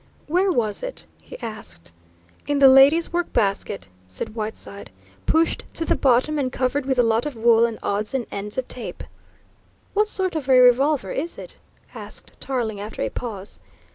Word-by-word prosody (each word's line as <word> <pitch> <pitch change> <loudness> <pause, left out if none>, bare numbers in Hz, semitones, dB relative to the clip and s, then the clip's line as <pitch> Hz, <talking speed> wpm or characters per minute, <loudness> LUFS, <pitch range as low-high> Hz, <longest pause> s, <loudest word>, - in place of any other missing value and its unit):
"Where 365 +5 +2
was 220 - -1
it?" - - -6 0.2
he - - -11
asked. 210 - -8 0.6
"In 290 0 +1
the 275 -1 +7
lady's 275 +6 +6
work 350 0 -1
basket," 195 - -1 0.2
said 95 - -5
Whiteside. 215 -2 -6 0.4
"Pushed 325 +1 +2
to 325 - +1
the - - +2
bottom 270 +4 +2
and 260 -2 -1
covered 260 +2 -1
with 265 -1 +1
a 245 - +5
lot 230 +4 +1
of 290 - -6
wool 230 0 +4
and 230 - -6
odds 210 +5 -1
and 250 -3 -1
ends 205 +1 -5
of 260 - -2
tape." 245 - -4 0.9
"What 420 +1 +2
sort 375 -4 0
of 285 -4 -3
a 255 -1 +7
revolver 250 -2 +4
is 330 +5 -4
it?" - - -10 0.4
asked - - -10
Tarling 235 -6 -2
after 210 +2 -5
a - - -1
pause. 210 -5 -6
250 Hz, 175 wpm, -23 LUFS, 215-290 Hz, 0.9 s, the